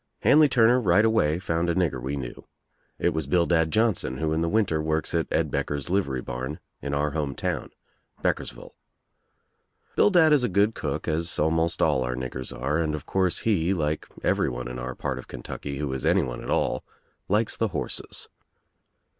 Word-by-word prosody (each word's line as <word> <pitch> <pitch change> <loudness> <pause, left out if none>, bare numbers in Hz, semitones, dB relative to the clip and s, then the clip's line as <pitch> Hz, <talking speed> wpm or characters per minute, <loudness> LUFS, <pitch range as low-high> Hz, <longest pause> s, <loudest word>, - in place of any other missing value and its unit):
Hanley 150 0 +6
Turner 125 0 +4
right 100 +1 +4
away 85 -9 +2
found 85 -2 -1
a 85 - +1
nigger 80 -9 0
we 65 +3 -3
knew. 65 -3 -7 0.5
It - - +2
was 80 -3 -2
Bildad 85 0 +3
Johnson 105 - +1
who 80 +1 0
in 80 - 0
the 85 - +1
winter 90 -6 +1
works 80 0 -1
at 85 -1 +1
Ed - - 0
Becker's 70 +3 -2
Uvery 70 -10 0
barn 65 +4 -4 0.2
in 70 0 -2
our 75 +1 0
home 75 -3 -2
town, - - -2 0.5
BeckersvUle. - - -2 1.2
Bildad 170 -6 +5
is 140 -4 +4
a 125 - +1
good 105 +3 +3
cook 75 -4 -4
as 85 +3 -1
almost 80 +1 +1
all 75 -5 +3
our 60 0 -2
niggers 65 0 -5
are 70 +6 -1
and 75 -2 0
of 75 - -7
course 95 -2 0
he, 95 -4 +1
like 75 -2 -1 0.2
everyone 60 +1 0
in 60 0 -6
our 60 0 -5
part 65 -2 -3
of - - -10
Kentucky 70 -1 -6
who 70 -2 -2
is 65 - -4
anyone - - +1
at - - -7
all, - - 0 0.4
likes 105 +3 +1
the 115 - 0
horses. 100 - -5
80 Hz, 180 wpm, -26 LUFS, 70-95 Hz, 1.2 s, Hanley